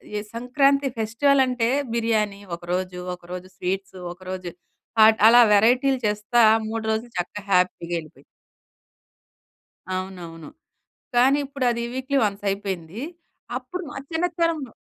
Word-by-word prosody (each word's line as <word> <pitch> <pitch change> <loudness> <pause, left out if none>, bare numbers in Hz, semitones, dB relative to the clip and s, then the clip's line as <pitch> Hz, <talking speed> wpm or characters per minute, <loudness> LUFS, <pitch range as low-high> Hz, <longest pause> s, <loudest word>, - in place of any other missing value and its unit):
ఈ - - 0 0.2
సంక్రాంతి 275 +4 +2
ఫెస్టివలంటే, 250 +1 +2 0.2
బిర్యానీ 215 -3 0
ఒకరోజు, 180 +1 -4 0.2
ఒకరోజు 180 +1 -9
స్వీట్సు, 190 +1 -3 0.2
ఒకరోజు 185 0 -7 0.5
హాట్, 220 0 +7
అలా 240 +1 +8
వెరైటీలు 250 +5 +4
చేస్తా 210 +3 +1 0.3
3 225 0 -3
రోజులు 225 +2 -3
చక్కగా 195 +3 -5
హ్యాపీగా 180 -1 +1
యెళ్ళిపోయింది. 155 -2 -10 1.7
అవునవును. 175 -4 -7 0.7
కానీ, 265 +4 +5
ఇప్పుడది 250 -4 -1
వీక్లీ 265 +2 0
వన్సయిపోయింది. 195 -2 -3 0.6
అప్పుడు 365 0 -5
మా - - -9
చిన్నతనంలో 330 -5 -1
220 Hz, 100 wpm, -23 LUFS, 185-255 Hz, 1.7 s, అలా